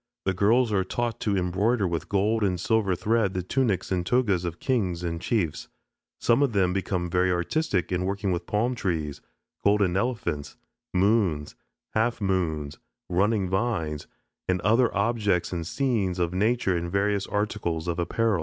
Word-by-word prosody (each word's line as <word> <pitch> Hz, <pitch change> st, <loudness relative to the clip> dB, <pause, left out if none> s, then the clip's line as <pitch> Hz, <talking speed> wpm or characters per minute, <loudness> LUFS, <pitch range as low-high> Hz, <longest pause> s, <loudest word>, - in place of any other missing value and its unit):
The 95 Hz, -, +2 dB
girls 110 Hz, +5 st, +3 dB
are 95 Hz, -2 st, +2 dB
taught 120 Hz, +3 st, -2 dB
to 100 Hz, -2 st, 0 dB
embroider 95 Hz, +4 st, +1 dB
with 85 Hz, -2 st, -3 dB
gold 105 Hz, +3 st, +1 dB
and 90 Hz, -3 st, +1 dB
silver 105 Hz, -1 st, +1 dB
thread 105 Hz, +1 st, +1 dB
the 90 Hz, -, -1 dB
tunics 105 Hz, -2 st, 0 dB
and 90 Hz, -2 st, +1 dB
togas 100 Hz, -4 st, +1 dB
of 85 Hz, -1 st, -4 dB
kings 95 Hz, -10 st, 0 dB
and 85 Hz, -1 st, -3 dB
chiefs. 95 Hz, -10 st, -1 dB, 0.5 s
Some 120 Hz, +4 st, +3 dB
of 140 Hz, -5 st, +2 dB
them 95 Hz, -3 st, +2 dB
become 90 Hz, -2 st, -1 dB
very 90 Hz, +1 st, +2 dB
artistic 90 Hz, -, 0 dB
in 90 Hz, 0 st, 0 dB
working 100 Hz, -1 st, -1 dB
palm 110 Hz, +7 st, 0 dB
trees, 80 Hz, -, -2 dB, 0.4 s
golden 100 Hz, -3 st, +3 dB
elephants, 95 Hz, -, -2 dB, 0.4 s
moons, 90 Hz, -6 st, +2 dB, 0.4 s
half 115 Hz, +2 st, +1 dB
moons, 80 Hz, -7 st, -1 dB, 0.3 s
running 100 Hz, +2 st, +2 dB
vines, 90 Hz, -7 st, -1 dB, 0.4 s
and 90 Hz, 0 st, +1 dB
other 115 Hz, +4 st, +3 dB
objects 100 Hz, -5 st, +1 dB
and 85 Hz, -2 st, -3 dB
scenes 110 Hz, -8 st, 0 dB
of 85 Hz, -1 st, 0 dB
nature 105 Hz, 0 st, +1 dB
in 85 Hz, 0 st, -2 dB
various 100 Hz, +1 st, 0 dB
articles 100 Hz, -5 st, -2 dB
of 85 Hz, 0 st, -1 dB
apparel. 105 Hz, +3 st, +1 dB
95 Hz, 155 wpm, -26 LUFS, 90-110 Hz, 0.5 s, girls